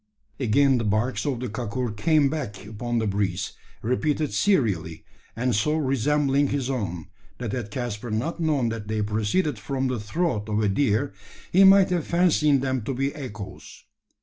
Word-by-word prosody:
Again 135 +2 +3
the - - -1
barks 110 +7 0
of 130 -4 -1
the 125 - -2
kakur 115 0 -3
came 155 +4 +3
back 135 -10 -4
upon 120 +3 -3
the 110 - +1
breeze 100 -1 -1 0.3
repeated 145 +5 0
serially, 100 - +1 0.3
and 125 +2 0
so 150 +9 +1
resembling 140 0 +2
his 135 -1 -1
own, 90 - -3 0.3
that 120 -4 -4
had 110 -2 -4
Caspar 120 0 -4
not 120 +12 -2
known 150 -7 +1
that 115 -2 -5
they 110 0 -1
proceeded 110 - 0
from 130 +4 -2
the 125 -3 -2
throat 110 - -2
of 105 0 0
a 105 - +2
deer, 120 +2 +1 0.4
he 190 +2 +6
might 195 -1 +7
have 175 -4 0
fancied 155 -5 +3
them 130 -2 -1
to 130 +5 -3
be 135 +2 -1
echoes. 105 -9 -9
125 Hz, 170 wpm, -25 LUFS, 105-145 Hz, 0.4 s, might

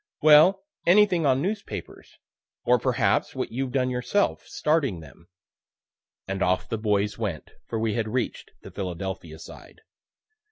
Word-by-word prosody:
"Well, 155 +6 +6 0.2
anything 180 -4 +4
on 135 +1 +2
newspapers, 205 +2 -6 0.5
or - - +3
perhaps - - 0
what - - -3
you've 130 +1 -3
done 130 -1 0
yourself, 125 +11 -1
starting 145 - 0
them." 80 +2 -15 1.0
And 95 0 -4
off 90 +1 +1
the 115 - -3
boys 105 0 0
went, 100 -9 -4 0.2
for 115 - -3
we 110 -1 0
had 110 0 -1
reach'd 120 +2 -3
the - - -10
Philadelphia 90 -3 -5
side. - - -13
115 Hz, 135 wpm, -25 LUFS, 95-150 Hz, 1.0 s, Well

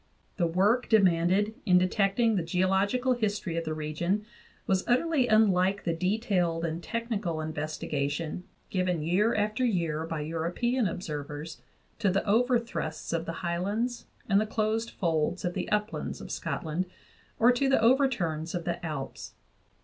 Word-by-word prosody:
The 175 -3 +2
work 205 +9 +2
demanded 195 0 +3
in 180 -4 +5
detecting 195 +5 +2
the 185 - +1
geological 190 +9 +1
history 210 -7 -2
of 165 0 -2
the 155 - -2
region 170 +7 -1 0.4
was 190 -1 +1
utterly 260 +1 +2
unlike 200 -3 +3
the 170 - 0
detailed 180 -2 0
and 165 +1 -3
technical 215 -7 -2
investigation 155 +1 -3 0.3
given 180 -4 0
year 195 +8 +2
after 215 +4 0
year 165 -8 0
by 160 -2 -3
European 175 +10 0
observers 150 -2 -5 0.4
to 200 - +2
the 195 +1 0
overthrusts 230 -9 0
of 165 0 -1
the - - -1
highlands 205 +8 -2 0.2
and 200 0 +4
the 215 - -1
closed 220 +1 0
folds 165 0 -1
of 175 - -1
the - - -3
uplands 210 +1 -1
of - - -8
Scotland 165 +3 -2 0.5
or 240 +2 +6
to 270 +2 +1
the 270 - +4
overturns 225 - +2
of 175 -2 -3
the 175 0 -3
Alps. 150 -5 -5
185 Hz, 145 wpm, -28 LUFS, 165-220 Hz, 0.5 s, or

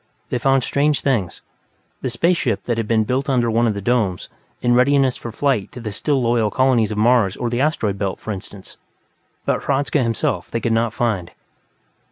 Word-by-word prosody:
They 125 - 0
found 135 0 +2
strange 145 +2 +1
things 115 -11 -1 0.6
the 130 - -2
space 170 +9 +2
ship 115 -10 -1
that 120 -2 -1
had 110 - -2
been 110 -1 +2
built 130 +5 -1
under 120 -3 +2
one 115 +1 +2
of 105 - 0
the 100 - -5
domes, 110 -6 0 0.3
in 120 0 +2
readiness 130 +1 +3
for 115 - -7
flight 125 -4 0
to - - -8
the 110 -3 -5
still 140 +7 0
loyal 115 -3 +1
colonies 125 -3 +2
on 105 - -4
Mars 110 -3 +3
or 120 -1 -2
the 120 +1 0
Asteroid 110 -10 0
Belt, 95 -2 -2
for 110 - -5
instance 95 0 -9 0.7
but - - 0
Hradzka 140 +1 +1
himself 115 -2 -1
they 115 - -2
could 115 -1 0
not 115 0 +1
find. 110 -8 -1
120 Hz, 200 wpm, -20 LUFS, 110-130 Hz, 0.7 s, readiness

